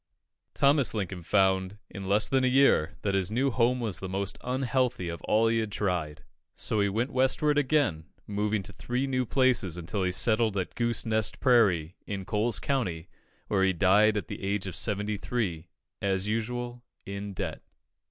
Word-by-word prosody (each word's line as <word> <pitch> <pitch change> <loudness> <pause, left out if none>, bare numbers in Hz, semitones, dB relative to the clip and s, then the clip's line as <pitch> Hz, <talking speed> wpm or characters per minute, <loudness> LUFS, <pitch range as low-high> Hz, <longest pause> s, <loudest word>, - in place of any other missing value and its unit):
Thomas 140 -3 +3
Lincoln 95 -3 -3
found, 95 +1 +1
in 100 -1 -7
less 105 +2 +2
than 135 -1 +1
a - - +3
year, 125 - +3
that 100 - 0
his 95 -2 0
new 130 +5 +1
home 125 +1 +2
was 110 -6 -2
the 95 - -6
most 95 +1 -3
unhealthy 125 -6 -1
of 85 - -6
all 110 +1 +3
he 115 0 +2
had 110 -2 -3
tried. 85 -7 -2 0.3
So 110 - -1
he 100 - +2
went 115 +7 -1
Westward 140 +3 +3
again, 130 - +1 0.2
moving 105 0 -1
to - - -7
three 125 +2 -2
new 130 -2 -1
places 125 - +2
until 90 +4 -3
he 90 -1 +1
settled 110 +2 +2
at 95 - -3
Goose 120 0 -1
Nest 110 -1 +1
Prairie, 95 - +3
in 100 -2 -4
Coles 105 +1 0
County, 95 -12 -2 0.4
where 95 -2 +1
he 95 -1 +3
died 100 +4 +4
at 105 - -3
the - - -7
age 100 0 -1
of 95 -3 -5
seventy 105 0 0
three, 95 -8 -3 0.3
"as 95 0 0
usual, 120 +2 -3 0.2
in 100 0 -6
debt." - - -4
105 Hz, 180 wpm, -28 LUFS, 95-120 Hz, 0.4 s, died